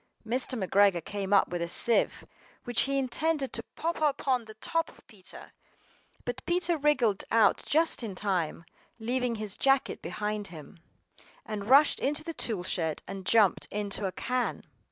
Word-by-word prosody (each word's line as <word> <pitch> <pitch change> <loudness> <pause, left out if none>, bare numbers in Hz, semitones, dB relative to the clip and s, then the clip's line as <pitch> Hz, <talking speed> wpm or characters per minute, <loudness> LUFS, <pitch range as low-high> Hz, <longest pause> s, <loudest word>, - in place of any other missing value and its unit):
MR. 245 -3 -1
McGREGOR 195 -4 +3
came 200 -1 -4
up 200 - +5
with 175 -1 -3
a 170 - -1
sieve, 230 +6 +2 0.4
which 240 -2 +1
he 275 - +1
intended 275 +2 0
to 230 - -1
pop 335 0 -2
upon 270 -5 +1
the 220 0 -12
top 330 +9 -1
of - - -19
Peter; 195 -4 -10 0.7
but 245 +1 -4
Peter 345 0 +2
wriggled 275 -9 +2
out 220 -3 +4
just 320 -1 +2
in 215 -5 -5
time, 180 -4 -1 0.3
leaving 245 +1 -1
his 215 -2 -5
jacket 270 0 +2
behind 210 -1 -3
him. 165 -2 -12 0.7
AND 210 -2 -5
rushed 280 +3 +6
into 295 +3 -1
the 330 0 -5
toolshed, 180 - -1
and 195 -1 -7
jumped 215 -4 +4
into 205 -1 -2
a - - -3
can. 250 +5 -2
225 Hz, 155 wpm, -29 LUFS, 200-270 Hz, 0.7 s, rushed